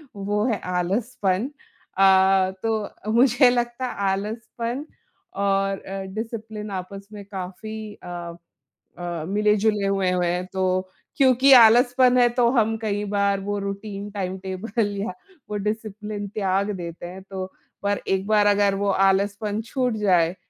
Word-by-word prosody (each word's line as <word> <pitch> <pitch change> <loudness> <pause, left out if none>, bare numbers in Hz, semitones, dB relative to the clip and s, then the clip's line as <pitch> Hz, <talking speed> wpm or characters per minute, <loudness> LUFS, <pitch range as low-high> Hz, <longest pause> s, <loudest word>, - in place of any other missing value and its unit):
वो 205 +2 -1
है 220 -5 0
आलसपन। 190 +4 -1 0.5
अ, 190 0 +5
तो 215 -1 -3
मुझे 245 +1 +5
लगता 240 +1 -1
आलसपन 225 +6 -3 0.5
और 195 0 0
अ, 195 0 -6
डिसिप्लिन 220 -2 -5
आपस 195 +1 -6
में 205 -1 -8
काफ़ी 205 +3 -7
अ 175 -1 -6 0.6
अ, 175 -2 -4
मिले-जुले 210 0 +2
हुए 195 -2 +1
हुए 180 -1 +1
हैं। 180 +1 -1
तो 185 0 0 0.3
क्योंकि 265 0 +5
आलसपन 245 +2 +6
है 245 -1 +6
तो 240 0 +2
हम 225 -3 +2
कई 205 -1 -1
बार 200 -1 +1
वो 205 +1 -2
रूटीन, 200 +1 -5
टाइम 190 -2 -3
टेबल 200 +4 -2
या 205 +4 -3 0.4
वो 210 - -3
डिसिप्लिन 210 0 -4
त्याग 195 0 0
देते 170 0 -7
हैं। 185 +2 -9
तो 190 -1 -3 0.4
पर 200 0 0
एक 190 0 0
बार 210 -1 +4
अगर 200 -1 +3
वो 200 0 0 0.2
आलसपन 205 +2 0
छूट 250 +1 -1
जाए 180 -4 +2
205 Hz, 140 wpm, -23 LUFS, 190-220 Hz, 0.6 s, आलसपन